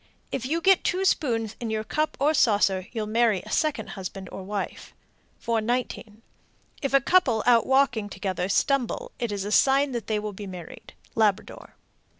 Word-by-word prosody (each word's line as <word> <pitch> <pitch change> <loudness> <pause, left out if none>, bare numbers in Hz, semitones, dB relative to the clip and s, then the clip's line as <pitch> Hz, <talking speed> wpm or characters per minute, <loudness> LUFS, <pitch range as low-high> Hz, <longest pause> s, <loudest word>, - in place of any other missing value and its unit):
If 255 -1 -3
you 330 +4 -1
get 385 +1 +4
two 370 +2 0
spoons 225 - 0
in 235 - -4
your 220 0 -2
cup 305 +7 -2
or 295 +3 +3
saucer, 200 -8 +2
you'll 220 -3 -3
marry 220 -3 +2
a - - -10
second 255 -9 0
husband 190 -1 -7
or - - -7
wife. 200 +1 -5 0.4
419. 230 -1 -2 0.6
If 275 -1 0
a 275 - +5
couple 260 -9 +3
out 235 -2 +4
walking 265 -6 +2
together 190 -2 -3
stumble, 275 - 0
it 235 -4 -2
is 200 -1 -3
a 205 - -4
sign 275 +4 +4
that 235 -3 -4
they 215 - 0
will 210 0 -4
be 200 +1 -8
married. 180 -3 -10 0.2
_Labrador. 215 -3 0
225 Hz, 170 wpm, -25 LUFS, 205-270 Hz, 0.6 s, a